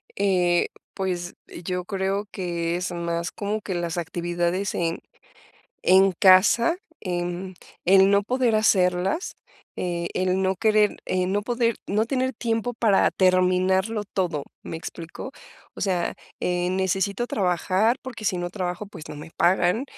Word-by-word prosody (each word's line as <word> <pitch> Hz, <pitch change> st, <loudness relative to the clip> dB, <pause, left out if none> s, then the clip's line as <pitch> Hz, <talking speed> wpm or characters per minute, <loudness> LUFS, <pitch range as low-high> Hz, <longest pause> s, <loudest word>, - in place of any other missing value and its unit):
Eh, 180 Hz, -3 st, +2 dB, 0.3 s
pues, 180 Hz, -2 st, -3 dB, 0.3 s
yo 180 Hz, +1 st, -3 dB
creo 195 Hz, +2 st, -1 dB
que, 170 Hz, -3 st, -2 dB
es 180 Hz, +1 st, -3 dB
más 170 Hz, 0 st, -2 dB
como 210 Hz, +1 st, -3 dB
que 190 Hz, -3 st, -4 dB
las 175 Hz, 0 st, -2 dB
actividades 175 Hz, +3 st, -1 dB
en 165 Hz, -1 st, -1 dB, 0.9 s
en 190 Hz, +1 st, +6 dB
casa, 200 Hz, -, +5 dB, 0.2 s
em, 175 Hz, 0 st, -3 dB, 0.3 s
el 190 Hz, +1 st, +6 dB
no 200 Hz, 0 st, +4 dB
poder 245 Hz, 0 st, +1 dB
hacerlas, 190 Hz, -, +2 dB, 0.4 s
eh, 170 Hz, -1 st, -2 dB
el 185 Hz, 0 st, +1 dB
no 190 Hz, 0 st, +1 dB
querer 215 Hz, +1 st, +3 dB
eh, 185 Hz, -1 st, 0 dB
no 200 Hz, +2 st, 0 dB
poder 235 Hz, 0 st, +1 dB
no 210 Hz, +3 st, +1 dB
tener 260 Hz, +1 st, -1 dB
tiempo 230 Hz, +1 st, -1 dB
para 220 Hz, -4 st, +3 dB
terminarlo 185 Hz, +3 st, +2 dB
todo, 170 Hz, -7 st, -1 dB, 0.2 s
¿me 165 Hz, -, -5 dB
explico?, 165 Hz, +8 st, -8 dB, 0.5 s
o -, -, -6 dB
sea, 185 Hz, -3 st, 0 dB, 0.2 s
eh, 180 Hz, 0 st, 0 dB
necesito 190 Hz, +4 st, 0 dB
trabajar, 190 Hz, +4 st, +1 dB
porque 245 Hz, -5 st, -8 dB
si 185 Hz, -3 st, +1 dB
no 175 Hz, 0 st, -3 dB
trabajo, 180 Hz, +1 st, -4 dB
pues, 195 Hz, -6 st, -11 dB
no 150 Hz, -, -7 dB
me 150 Hz, +3 st, -9 dB
pagan, 180 Hz, +5 st, +3 dB
185 Hz, 140 wpm, -24 LUFS, 175-210 Hz, 0.9 s, en